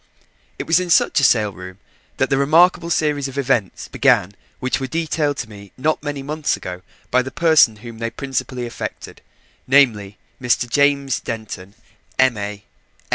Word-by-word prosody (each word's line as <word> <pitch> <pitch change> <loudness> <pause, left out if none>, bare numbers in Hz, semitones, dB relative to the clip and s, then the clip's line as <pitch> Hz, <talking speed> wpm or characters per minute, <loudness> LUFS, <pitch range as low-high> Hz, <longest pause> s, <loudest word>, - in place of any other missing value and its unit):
It - - -5
was 165 +2 +3
in 180 -1 -4
such 165 - +4
a - - 0
sale 110 -5 +3
room 90 -1 -10 0.4
that 135 - 0
the 135 - +3
remarkable 170 +4 +4
series 150 -4 0
of 135 +1 -9
events 125 -7 -1
began 95 +3 +2 0.3
which 130 +1 -1
were 135 - -3
detailed 155 -1 -1
to 125 - -4
me 100 -2 -13
not 155 +4 0
many 145 -2 -5
months 150 +2 -1
ago 90 0 -7 0.3
by 125 - +4
the 130 - -5
person 160 -5 +4
whom 115 -1 -9
they 115 0 -2
principally 130 -2 -4
affected, 120 - -7 0.5
namely, 115 -7 +3 0.2
Mr. 125 0 +1
James 140 0 +2
Denton, 105 -4 -7 0.4
M.A. 105 -6 0
130 Hz, 160 wpm, -20 LUFS, 110-145 Hz, 0.5 s, such